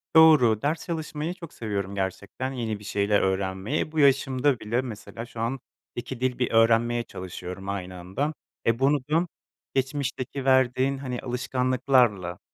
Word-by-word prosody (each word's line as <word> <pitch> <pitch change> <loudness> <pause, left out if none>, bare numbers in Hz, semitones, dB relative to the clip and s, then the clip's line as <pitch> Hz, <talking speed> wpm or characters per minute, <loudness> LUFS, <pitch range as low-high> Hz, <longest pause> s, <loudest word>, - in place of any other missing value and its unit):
Doğru, 145 -9 +7
ders 150 +3 -1
çalışmayı 160 0 -3
çok 170 -4 -11
seviyorum 100 -3 -3
gerçekten 100 +7 -3
yeni 110 -4 -3
bir - - -13
şeyler 100 0 +2
öğrenmeyi, 95 +6 -1
e, 155 - -4
bu 160 - -2
yaşımda 135 -1 +3
bile 115 +4 0
mesela 115 -1 -7
şu 115 -1 -11
an 120 +4 -1 0.4
2 120 +1 -5
dil 130 -1 0
bir 125 - +1
öğrenmeye 115 +1 +4
çalışıyorum 90 0 -7
aynı 95 -2 -4
anda, 95 - -2 0.3
e, 115 +1 +2
bunu 140 +2 +4
da 170 +3 +3 0.5
geçmişteki 135 0 -2
verdiğin 130 +1 +3
hani 125 -3 -4
alışkanlıklarla, 125 -6 +1
125 Hz, 150 wpm, -26 LUFS, 105-135 Hz, 0.5 s, Doğru